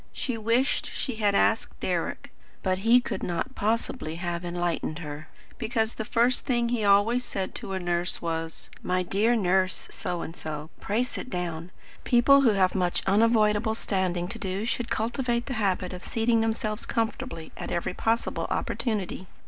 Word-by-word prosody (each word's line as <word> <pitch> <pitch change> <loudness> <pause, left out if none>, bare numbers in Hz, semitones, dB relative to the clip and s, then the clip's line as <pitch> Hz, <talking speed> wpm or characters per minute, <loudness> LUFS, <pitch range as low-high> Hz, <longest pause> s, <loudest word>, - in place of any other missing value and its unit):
She 250 - -2
wished 230 +5 +1
she 250 -5 -4
had 205 -2 +2
asked 225 +2 +2
Deryck. - - -2 0.3
But 185 -1 +1
he 230 +5 +6
could 245 - -4
not 175 +9 -2
possibly 220 -6 -1
have 175 0 -3
enlightened 175 -3 -2
her, 150 -2 -7 0.3
because 225 -1 0
the 220 - -4
first 240 +3 +2
thing 240 -3 +1
he 235 -3 0
always 205 +5 +4
said 195 -5 -4
to 195 - -5
a 190 - -1
nurse 175 0 0
was: 165 -1 -4
"My 185 0 0
dear 210 +6 +2
Nurse 185 -3 +2
SO 175 -1 -3
AND 165 - -7
SO, 155 -1 -6
pray 215 +5 0
sit 250 - -5
down. 175 -3 -3 0.3
People 270 +3 +6
who 235 -6 +5
have 185 -2 +3
much 180 -2 +1
unavoidable 215 +1 +3
standing 185 -5 -1
to - - -6
do 190 +2 -2
should 235 0 -1
cultivate 235 +1 0
the 270 - -4
habit 185 -2 0
of 180 - -7
seating 225 0 +2
themselves 220 -1 -1
comfortably 195 -8 -2
at - - -6
every 170 +1 -1
possible 225 +4 0
opportunity." 200 -5 -2
205 Hz, 165 wpm, -27 LUFS, 180-230 Hz, 0.3 s, he